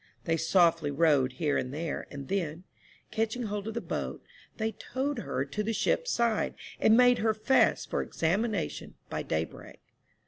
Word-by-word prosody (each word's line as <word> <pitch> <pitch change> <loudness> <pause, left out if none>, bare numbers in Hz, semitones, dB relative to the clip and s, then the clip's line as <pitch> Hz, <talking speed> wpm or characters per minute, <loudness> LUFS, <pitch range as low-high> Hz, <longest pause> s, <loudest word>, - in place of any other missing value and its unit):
They 165 - +1
softly 165 -2 +3
rowed 145 -3 +3
here 150 -2 0
and 125 - -4
there, 155 +2 -4
and 140 -2 -8
then, 175 -3 -2 0.5
catching 225 +2 -1
hold 205 -1 -3
of 220 - -4
the - - -1
boat, - - -4 0.3
they 220 0 0
towed 265 +5 -3
her 135 - -2
to 145 +9 -3
the 220 +2 -1
ship's - - +1
side, 235 - +1 0.2
and 220 - +5
made 245 0 +6
her 220 -1 +2
fast 260 +5 +2
for - - +1
examination 195 +2 -1 0.2
by - - -2
daybreak. 80 +1 -4
195 Hz, 165 wpm, -29 LUFS, 155-225 Hz, 0.5 s, made